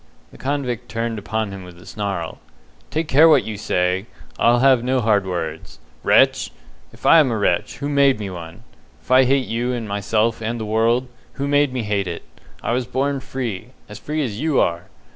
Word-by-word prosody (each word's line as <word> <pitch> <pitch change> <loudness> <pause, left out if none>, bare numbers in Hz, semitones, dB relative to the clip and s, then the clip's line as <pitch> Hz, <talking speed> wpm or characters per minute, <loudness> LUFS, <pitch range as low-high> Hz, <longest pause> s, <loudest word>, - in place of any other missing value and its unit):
The - - -15
convict 130 -4 -3
turned 115 -1 -3
upon 110 0 -3
him 95 -1 -8
with 90 -1 -13
a 90 - -15
snarl. 95 -6 -4 0.5
"Take 160 +1 -2
care 155 +3 +6
what 145 -4 +5
you 110 - -5
say! 95 -1 -1 0.3
I'll 120 +1 +4
have 130 -1 +4
no 130 +1 +1
hard 105 -4 +2
words. 80 -3 -5 0.2
Wretch! - - +3 0.4
If - - -15
I 165 - +8
am 145 -4 +4
a 115 - -1
wretch, 100 +1 0
who 140 +2 -4
made 140 -4 +3
me 100 -2 -5
one? 85 -2 -9 0.4
If - - -12
I 130 0 +6
hate 135 0 +2
you 120 +2 -1
and 115 -3 -4
myself 105 +3 0
and 115 +2 -3
the 110 - -4
world, 115 +4 +1 0.3
who 140 - -3
made 145 -1 +3
me 125 -2 -3
hate 100 -2 -1
it? 85 -1 -5 0.4
I - - -1
was 125 0 -1
born 140 +2 -1
free 125 -3 -5
as 105 0 -10
free 155 0 -2
as 105 -4 -5
you 155 -3 +2
are. 85 +1 0
115 Hz, 200 wpm, -21 LUFS, 100-130 Hz, 0.5 s, I